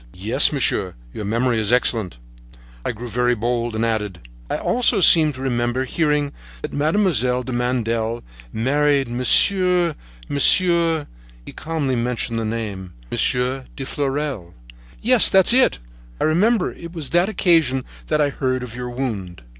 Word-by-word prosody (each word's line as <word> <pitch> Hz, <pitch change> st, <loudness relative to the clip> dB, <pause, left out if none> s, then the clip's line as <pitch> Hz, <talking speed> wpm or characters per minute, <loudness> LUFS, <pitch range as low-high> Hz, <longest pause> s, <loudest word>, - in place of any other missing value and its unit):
"Yes, 115 Hz, +9 st, +3 dB
monsieur, 110 Hz, -9 st, -1 dB, 0.2 s
your 105 Hz, -, -6 dB
memory 115 Hz, +2 st, 0 dB
is 110 Hz, 0 st, 0 dB
excellent." 115 Hz, -, 0 dB, 0.7 s
I -, -, -2 dB
grew 115 Hz, +2 st, -8 dB
very 125 Hz, +2 st, 0 dB
bold 120 Hz, 0 st, -2 dB
and 110 Hz, +1 st, 0 dB
added: 105 Hz, -, -3 dB, 0.2 s
"I -, -, -1 dB
also 240 Hz, -3 st, +2 dB
seem 160 Hz, -4 st, +7 dB
to 130 Hz, 0 st, -8 dB
remember 120 Hz, 0 st, -1 dB
hearing 150 Hz, 0 st, -1 dB, 0.3 s
that -, -, -6 dB
Mademoiselle 145 Hz, -, +1 dB
de 130 Hz, -, -7 dB
Mandel 115 Hz, -2 st, -2 dB, 0.3 s
married 140 Hz, +3 st, +1 dB
Monsieur—Monsieur—" 165 Hz, -, +2 dB, 0.4 s
He -, -, -9 dB
calmly 155 Hz, -4 st, -3 dB
mentioned 120 Hz, -1 st, -2 dB
the 115 Hz, -, -3 dB
name: 105 Hz, -5 st, -5 dB, 0.2 s
"Monsieur 125 Hz, +1 st, 0 dB
de 135 Hz, -, -6 dB
Fleurel." 135 Hz, -, -4 dB, 0.5 s
"Yes, 245 Hz, -1 st, +7 dB
that's 190 Hz, +4 st, +5 dB
it! 260 Hz, -, +3 dB, 0.4 s
I -, -, -1 dB
remember 190 Hz, +6 st, +1 dB
it 170 Hz, 0 st, -11 dB
was 160 Hz, -6 st, -6 dB
on -, -, -14 dB
that 175 Hz, +3 st, +3 dB
occasion 160 Hz, -11 st, +1 dB, 0.2 s
that 155 Hz, -, 0 dB
I 145 Hz, -1 st, +2 dB
heard 130 Hz, -2 st, -2 dB
of 120 Hz, -3 st, -8 dB
your 125 Hz, 0 st, -6 dB
wound." 105 Hz, -, -5 dB
130 Hz, 145 wpm, -20 LUFS, 115-155 Hz, 0.7 s, seem